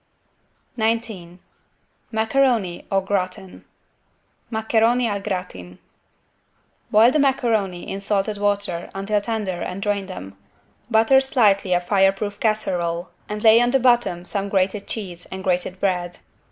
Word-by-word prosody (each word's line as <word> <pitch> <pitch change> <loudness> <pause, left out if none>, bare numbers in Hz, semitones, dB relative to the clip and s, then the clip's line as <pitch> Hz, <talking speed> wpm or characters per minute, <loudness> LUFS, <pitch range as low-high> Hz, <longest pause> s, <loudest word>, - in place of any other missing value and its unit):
19 220 -6 -2 0.7
MACARONI 220 -4 +1
"AU 195 0 +2
GRATIN" 190 -1 -4 0.9
(Maccheroni 225 +2 +2
al 205 -2 -2
gratin) 180 - -5 1.1
Boil 225 +3 +6
the 305 - +1
macaroni 230 -10 0
in 195 - -5
salted 200 +1 -1
water 200 -4 -1
until 205 +2 0
tender 205 -5 -3
and 180 +1 -4
drain 205 -2 -1
them. 95 - -8 0.5
Butter 230 +4 +5
slightly 210 -9 +2
a 175 - +3
fireproof 195 +2 +1
casserole 175 -6 -1 0.2
and 210 0 -5
lay 225 +1 +7
on 240 - +3
the 270 +2 +3
bottom 240 -8 +2
some 200 +2 -3
grated 195 +1 0
cheese 185 -6 -6
and 190 0 -7
grated 180 0 -1
bread. 180 -3 -1
200 Hz, 125 wpm, -22 LUFS, 185-220 Hz, 1.1 s, lay